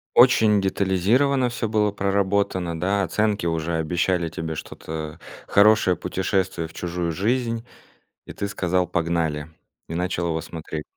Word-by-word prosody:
Очень 110 -4 +6
детализировано 105 +8 +2
всё 115 -1 -3
было 105 -1 +1
проработано, 100 -3 0
да? 100 +3 +1
Оценки 105 0 0
уже 80 0 -1
обещали 85 +2 0
тебе 80 0 -5
что-то 80 +1 -7 0.3
хорошее, 100 -3 +5
путешествие 95 -2 -1
в 80 - -14
чужую 85 -1 -3
жизнь, 115 +4 -1 0.6
и - - -9
ты 100 - -3
сказал: 90 -3 0
"Погнали", 80 -3 -1 0.4
и 80 - -4
начал 90 -1 -1
его 80 -1 -1
смотреть? 80 -2 -6
90 Hz, 130 wpm, -23 LUFS, 85-105 Hz, 0.6 s, Очень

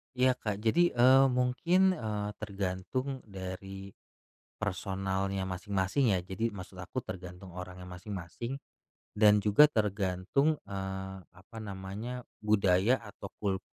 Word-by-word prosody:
Iya, 130 +1 +5
Kak. 105 -1 -3
Jadi, 175 +10 +3
eee, 130 +2 +7
mungkin, 135 +10 +3
eee, 105 - -2
tergantung 100 +7 -3
dari 95 0 -7 0.7
personalnya 95 -1 -2
masing-masing 95 +5 +1
ya. - - +1
Jadi 95 +5 -1
maksud 95 -3 -9
aku 105 +8 -4
tergantung 90 0 -8
orangnya 90 +1 -8
masing-masing 90 +6 -6 0.6
dan 105 0 +6
juga 105 +9 +6
tergantung, 105 - +1
eee, 95 -1 -5
apa 95 +6 -15
namanya, 105 +5 -6 0.2
budaya 105 +2 +4
atau 105 - -9
kul 95 -2 -1
100 Hz, 115 wpm, -31 LUFS, 95-115 Hz, 0.7 s, eee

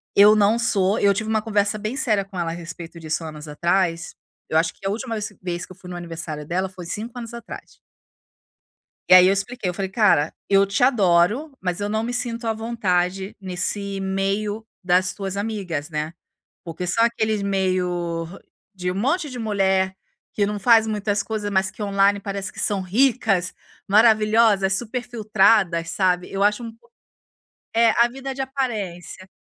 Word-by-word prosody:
Eu 205 +2 +8
não 215 +2 +3
sou 205 -3 +1
eu 200 - +4
tive 215 +3 -2
uma 220 0 +1
conversa 210 -1 0
bem 215 +5 -4
séria 215 -6 +1
com 195 -1 -11
ela 165 -1 -1
a - - -4
respeito 170 0 -9
disso 160 +1 -2
anos 155 -1 -8
atrás, 170 +2 0 0.3
eu 160 - +2
acho 165 0 0
que - - -15
a - - +1
última 230 +2 -4
vez 210 -1 -4
vez 175 -1 -3
que - - -18
eu - - -11
fui 185 -1 -13
no 180 - -6
aniversário 165 -3 -6
dela 185 +4 -1
foi 185 -2 -10
5 225 +7 -5
anos 235 -1 -7
atrás. 235 -1 -10 1.3
E - - +8
aí, 185 0 +9
eu 190 - +5
expliquei, 200 +2 -2
eu 180 - -2
falei: 190 0 -3
"Cara, 190 -8 +3 0.2
eu 195 0 +5
te 200 +3 -2
adoro, 215 - +3
mas 180 0 -2
eu 205 - -1
não 220 +1 -1
me 240 +2 -3
sinto 240 -1 -3
à 225 - +2
vontade 195 -4 -1
nesse 195 +2 -2
meio 195 +3 -2 0.2
das 185 +1 +2
tuas 195 0 -5
amigas, 195 -8 -3
né." 155 +1 -3 0.5
Porque 175 +1 -5
são 230 +6 +2
aqueles 220 -2 0
meio 180 -3 -1
hã, 175 +4 -11 0.3
de 180 -1 -3
um 185 - -5
monte 290 - 0
de 255 - -7
mulher 190 -4 +1 0.4
que 205 - +1
não 210 0 -3
faz 225 +1 +5
muitas 205 -1 -1
coisas, 215 -2 -3
mas 190 -1 +2
que 210 +3 -7
online 200 0 +2
parece 200 -1 -4
que - - -11
são 200 -2 +1
ricas, 200 -3 +1 0.3
maravilhosas, 215 -1 +4
superfiltradas, 215 -6 +1
sabe. 180 -2 0
Eu 195 - -3
acho 210 +3 +2
um 225 -1 -8
pou 230 - -28 0.9
É, 230 0 +6 0.2
a - - +1
vida 270 +2 -6
de 270 - -4
aparência. 215 -9 -4
200 Hz, 185 wpm, -22 LUFS, 180-220 Hz, 1.3 s, aí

